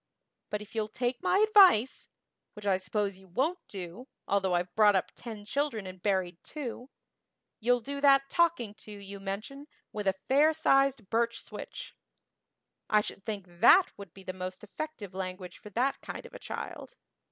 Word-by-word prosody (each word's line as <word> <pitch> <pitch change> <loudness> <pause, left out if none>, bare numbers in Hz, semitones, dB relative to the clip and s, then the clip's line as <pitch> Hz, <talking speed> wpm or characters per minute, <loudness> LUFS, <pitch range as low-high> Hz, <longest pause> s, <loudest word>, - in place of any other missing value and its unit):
But 210 0 -3
if 210 - -17
you'll 220 -2 -1
take 245 +3 -2
my - - +2
advice 375 - +5 0.4
which 210 0 -10
I 195 -2 +3
suppose 195 +1 -2
you 190 - -18
won't 280 - 0
do, 195 +6 -7 0.2
although 190 -2 +2
I've 175 +1 -1
brought 210 -2 +5
up 190 - 0
ten 220 -4 -8
children 255 -4 -1
and 185 -1 -9
buried 185 -4 0
two 255 -3 -6 0.7
you'll 245 +2 +2
do 280 +3 -5
that 275 -1 +6
'talking 310 -9 +1
to' 210 - -10
you 200 -1 -8
mention 215 +9 -6 0.3
with 210 -2 -3
a 190 - +3
fair 295 +4 +5
sized 275 -7 +2
birch 235 +1 +1
switch. - - -9 0.9
I 210 - +5
should 195 - -7
think 205 -4 -4
that 175 - +5
would 200 -4 -10
be 195 - -14
the 185 - -5
most 185 +1 -6
effective 210 - -6
language 185 -1 -6
for 210 - -11
that 250 +7 0
kind - - -7
of - - -12
a - - -8
child. - - -7
210 Hz, 175 wpm, -30 LUFS, 190-270 Hz, 0.9 s, that